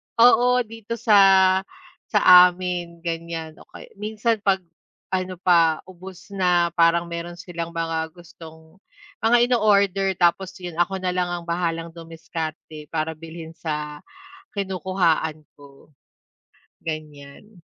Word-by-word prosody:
Oo 245 +1 +5
dito, 225 0 -7
sa 220 -3 +4 0.9
sa - - +2 0.3
amin 175 -1 -5
ganyan, 165 -1 -5
o - - -17
kay - - -12
minsan 220 +1 -1
'pag 195 -2 +1 0.5
ano 185 0 -2
pa, 165 -3 +3
ubos 185 +1 -12
na 180 -3 +2
parang 170 0 +3
meron 170 +1 -6
silang 170 -1 -6
mga 165 -1 -2
gustong 160 -1 -15 0.5
mga 235 +2 +5
ino-order 200 -5 +2
tapos, 180 +2 +2
yun 175 -2 -6
ako 190 +2 0
na 180 - 0
lang 180 -1 0
ang 175 -1 -4
bahalang 170 -1 -2
dumiskarte 160 -2 -7
para 160 0 -2
bilhin 160 0 -10
sa 150 -2 -5 0.6
kinukuhaan 180 -5 -1 0.2
ko, 140 +1 -18 0.9
ganyan. 155 +5 -8
175 Hz, 120 wpm, -23 LUFS, 160-190 Hz, 0.9 s, Oo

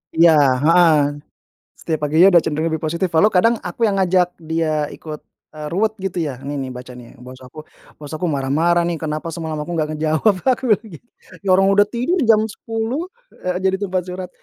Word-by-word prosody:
Iya, 165 0 +6 0.3
heeh, 165 0 +5 0.8
setiap 160 -2 -3
paginya 160 +5 +5
udah 175 -4 +6
cenderung 155 +2 -1
lebih 160 -1 -3
positif 170 +4 -1
walau 210 +7 +4
kadang 230 +6 +3
aku 220 +6 -1
yang 200 - 0
ngajak 180 -2 +1
dia 155 -2 -2
ikut, 155 -1 -9 0.3
eee, 150 0 -6
ruwet, 215 +5 0
gitu, 190 -3 -4
ya, 135 - -5
"Ini, 145 0 -4
nih, 130 -1 -5
baca, 125 0 -9
nih, 125 -1 -13
bos 130 0 -11
aku 130 +4 -12 0.3
bos 145 0 -11
aku 165 +3 -3
marah-marah, 155 +4 +1
nih, 170 -1 -2
kenapa 155 +1 -4
semalam 160 -1 -5
aku 175 - -8
nggak 155 -2 -2
ngejawab." 160 +7 +1
Aku 260 -1 +1
bilang 215 - -19
gitu. 205 +9 -14 0.3
Ya, 195 - -5
orang 195 +1 +3
udah 205 +1 +4
tidur 255 - -1
jam 220 -1 +5
10.00, 225 - -4 0.4
eee, 180 +1 -2
jadi 190 0 +2
tempat 185 0 -1
curhat, 180 0 -7
170 Hz, 195 wpm, -19 LUFS, 155-195 Hz, 0.8 s, Iya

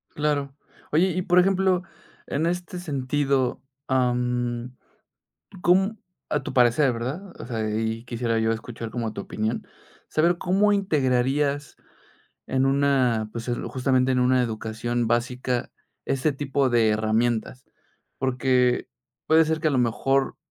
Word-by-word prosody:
Claro. 145 -2 -1 0.4
Oye, 175 +5 +3
y 185 +2 -1
por 180 0 +4
ejemplo, 190 -1 +2 0.4
en 155 +3 -1
este 180 +1 -3
sentido, 140 -4 0 0.3
am, 125 -1 0 0.9
¿cóm 190 +5 +3 0.3
a 150 -2 0
tu - - -5
parecer, 125 +1 +4
verdad? 140 +12 -5
O - - -7
sea, 110 -3 -2
y 110 +1 -2
quisiera 115 -1 -1
yo 110 0 +2
escuchar 115 0 -6
como 115 -3 -3
tu 100 - -5
opinión, 110 +2 -3 0.4
saber 170 +2 +2
cómo 200 +3 +2
integrarías 145 -5 +1 0.7
en 130 0 +1
una, 135 -5 +2
pues 115 +1 -6
el 120 - -2
justamente 130 0 +1
en 125 - +2
una 125 0 +3
educación 115 +1 -2
básica 125 +1 -1 0.4
ese 135 +3 +1
tipo 135 -1 0
de 115 -2 +4
herramientas, 110 +3 0 0.5
porque 125 -1 +1 0.4
puede 160 +1 +5
ser 160 0 -1
que 160 - +2
a - - 0
lo 130 - +1
mejor 135 +3 +1
130 Hz, 135 wpm, -25 LUFS, 120-150 Hz, 0.9 s, puede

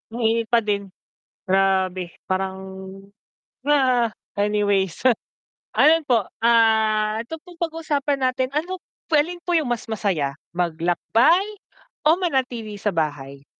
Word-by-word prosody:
Mainit 230 -1 +1
pa 230 -1 +3
din 200 -1 -1 0.6
grabe 190 -2 +1 0.2
parang, 190 0 -2 1.1
ah, 255 -5 +3 0.3
anyways 205 -3 +1 0.8
ayon 320 0 +5
po 230 -5 +3 0.2
ah 220 -2 +3
ito 320 - -6
pong 355 -2 -14
pag-usapan 310 -4 -1
natin 255 0 +1
ano 340 +6 -2 0.3
p 330 - -1
alin 345 +4 +1
po 350 - 0
yung 295 -6 0
mas 240 - -2
masaya 185 -11 -1 0.2
maglakbay 180 - +2 0.6
o 320 - +6
manatili 250 - -1
sa 205 - +1
bahay? 140 -4 -3
225 Hz, 115 wpm, -23 LUFS, 190-280 Hz, 1.1 s, o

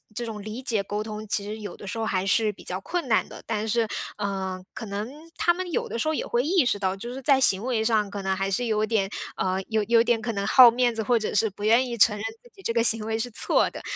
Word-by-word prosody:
这 240 - -3
种 220 -2 -6
理 215 +4 -6
解 220 -5 0
沟 205 +2 -4
通， 215 0 -7
其 200 0 0
实 215 +2 -6
有 205 -4 -7
的 - - -11
时 195 - -5
候 225 - -1
还 190 -3 -1
是 215 +2 +2
比 - - -15
较 180 +1 -2
困 350 - -3
难 220 - +2
的， - - -11
但 220 -1 -2
是 230 0 +1 0.3
呃， 190 -2 -3
可 - - -7
能 205 +3 -4 0.3
他 345 - +3
们 365 +1 -5
有 - - -1
的 230 - -4
时 310 - -1
候 315 - +1
也 - - -2
会 240 - +1
意 335 -1 +2
识 205 - 0
到， 190 -1 0
就 235 +5 -7
是 265 - -7
在 270 0 +4
行 200 -6 +3
为 240 -3 0
上 220 -3 +1
可 200 0 -5
能 190 0 -1
还 195 +1 -2
是 220 +6 0
有 215 -2 +1
点 215 -3 0 0.3
呃， 185 0 -1
有 220 -1 +1
有 230 +2 +4
点 235 -1 +1
可 230 +1 -2
能 200 -2 -3
好 245 0 +8
面 240 0 +1
子， 220 - -1
或 235 +2 +2
者 215 - -3
是 220 +2 +3
不 205 +1 -11
愿 230 +4 +4
意 235 - -4
承 210 0 +5
认 205 - -6 0.2
自 240 - -19
己 390 - -16
这 230 - -2
个 230 -1 +2
行 225 -2 +4
为 220 0 -1
是 245 +2 -2
错 - - +2
的， - - -9
220 Hz, 315 characters per minute, -25 LUFS, 205-235 Hz, 0.3 s, 好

